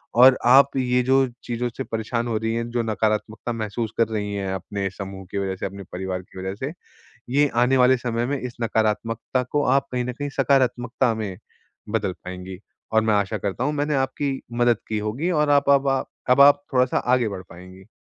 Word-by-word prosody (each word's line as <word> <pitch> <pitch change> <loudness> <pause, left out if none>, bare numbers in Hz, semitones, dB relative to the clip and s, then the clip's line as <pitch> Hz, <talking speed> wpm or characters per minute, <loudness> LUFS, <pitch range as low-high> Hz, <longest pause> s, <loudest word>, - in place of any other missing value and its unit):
और 130 +2 +8
आप 135 +2 +6
ये 125 -1 +2
जो 135 +1 +3 0.2
चीज़ों 120 +1 -2
से 135 - -2
परेशान 115 +1 -3
हो 115 -2 0
रही 110 +1 -1
हैं, 115 0 -2
जो 120 -1 0
नकारात्मकता 110 +1 -1
महसूस 110 0 -3
कर 115 - +3
रही 105 -2 -3
हैं 95 -1 -2
अपने 100 +1 -3
समूह 95 0 -8
की 100 - -3
वजह 95 -1 -2
से, - - -5
अपने 100 0 -6
परिवार 95 0 -3
की 95 +1 -13
वजह 95 +1 -4
से, 135 +7 -4 0.6
ये 145 +3 +3 0.2
आने 130 +2 +3
वाले 125 0 +5
समय 120 -1 -2
में 140 +1 -1
इस 125 -2 -6
नकारात्मकता 115 +3 0
को 145 0 +1
आप 140 - -1
कहीं 125 -1 -1
न 125 - -3
कहीं 145 +3 -4
सकारात्मकता 125 -2 +2
में 100 -4 -4 0.5
बदल 90 - -1
पाएँगी। 90 0 -7 0.3
और 110 - +5
मैं 110 -1 +2
आशा 100 +1 0
करता 100 +5 -3
हूँ 150 - 0
मैंने 145 0 0
आपकी 135 +1 -1 0.2
मदद 120 -2 +4
की 110 -1 -1
होगी 125 +12 -2
और 150 -2 +2
आप 140 -1 +3
अब 140 -1 +6
ब 140 - +1
आप, 135 0 0 0.2
अब 125 +2 +6
आप 145 0 +7
थोड़ा-सा 125 0 +2
आगे 125 -2 +2
बढ़ 95 -2 -6
पाएँगी। 95 +3 -13
115 Hz, 210 wpm, -23 LUFS, 105-130 Hz, 0.6 s, और